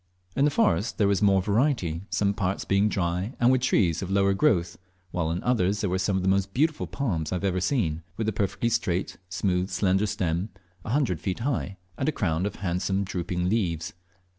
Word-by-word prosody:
In 135 Hz, -, +3 dB
the -, -, +4 dB
forest 145 Hz, -, +1 dB
there 105 Hz, -, +3 dB
was 100 Hz, 0 st, +1 dB
more 95 Hz, -2 st, +4 dB
variety, 105 Hz, -, +1 dB
some 100 Hz, -1 st, +1 dB
parts 100 Hz, -1 st, -2 dB
being 100 Hz, +2 st, +3 dB
dry, 90 Hz, +4 st, -1 dB
and 120 Hz, +1 st, +5 dB
with 130 Hz, -1 st, +2 dB
trees 95 Hz, -10 st, +2 dB
of 95 Hz, -, -4 dB
a -, -, -1 dB
lower 100 Hz, 0 st, +3 dB
growth, 90 Hz, -, +1 dB, 0.3 s
while 85 Hz, -3 st, -1 dB
in 85 Hz, +2 st, -2 dB
others 105 Hz, -5 st, +1 dB
there 100 Hz, -4 st, -1 dB
were 95 Hz, -, 0 dB
some 95 Hz, +1 st, 0 dB
of 95 Hz, -, -2 dB
the -, -, 0 dB
most 95 Hz, 0 st, +1 dB
beautiful 155 Hz, +3 st, +1 dB
palms 90 Hz, -, -2 dB
I -, -, 0 dB
have 90 Hz, -, -4 dB
ever 95 Hz, -2 st, 0 dB
seen, 90 Hz, -, 0 dB, 0.2 s
with 110 Hz, -, -2 dB
a 110 Hz, -, 0 dB
perfectly 105 Hz, +4 st, 0 dB
straight, 95 Hz, -5 st, -1 dB
smooth, 95 Hz, 0 st, 0 dB
slender 95 Hz, +2 st, +1 dB
stem, 90 Hz, +1 st, -1 dB, 0.3 s
a -, -, -7 dB
hundred 115 Hz, -, +1 dB
feet 95 Hz, +4 st, -3 dB
high, 120 Hz, -7 st, -2 dB, 0.2 s
and 135 Hz, -, +1 dB
a -, -, +1 dB
crown 90 Hz, -, 0 dB
of 105 Hz, -, -6 dB
handsome 95 Hz, +2 st, -1 dB
drooping 90 Hz, -1 st, -2 dB
leaves. 85 Hz, -6 st, -1 dB
95 Hz, 215 wpm, -26 LUFS, 90-110 Hz, 0.3 s, and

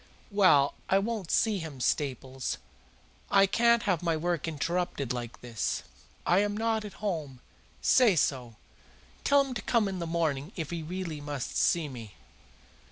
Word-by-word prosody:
"Well, 185 Hz, -9 st, +5 dB, 0.2 s
I 190 Hz, -, +5 dB
won't 205 Hz, -3 st, -2 dB
see 215 Hz, -3 st, +2 dB
him, 160 Hz, -5 st, -7 dB
Staples. 130 Hz, -1 st, -1 dB, 0.7 s
I 195 Hz, 0 st, +6 dB
can't 235 Hz, +3 st, +3 dB
have 185 Hz, -5 st, +1 dB
my 165 Hz, -2 st, +1 dB
work 170 Hz, -1 st, -1 dB
interrupted 160 Hz, -4 st, -2 dB
like 120 Hz, -1 st, -6 dB
this. 120 Hz, -3 st, -2 dB, 0.4 s
I 175 Hz, -, +4 dB
am 205 Hz, 0 st, 0 dB
not 225 Hz, -1 st, 0 dB
at 210 Hz, -, -8 dB
home. 155 Hz, -10 st, -3 dB, 0.4 s
Say 235 Hz, -7 st, +5 dB
so. 125 Hz, -6 st, 0 dB, 0.7 s
Tell 280 Hz, 0 st, +5 dB
him 270 Hz, -2 st, -5 dB
to 225 Hz, -, -4 dB
come 230 Hz, -3 st, +2 dB
in 190 Hz, -2 st, -3 dB
the 170 Hz, -, -3 dB
morning 160 Hz, -1 st, -1 dB
if 160 Hz, -4 st, -4 dB
he 170 Hz, -1 st, -3 dB
really 165 Hz, -2 st, -5 dB
must 145 Hz, -3 st, -5 dB
see 170 Hz, -3 st, +2 dB
me." 115 Hz, -7 st, -9 dB
170 Hz, 160 wpm, -29 LUFS, 140-200 Hz, 0.7 s, I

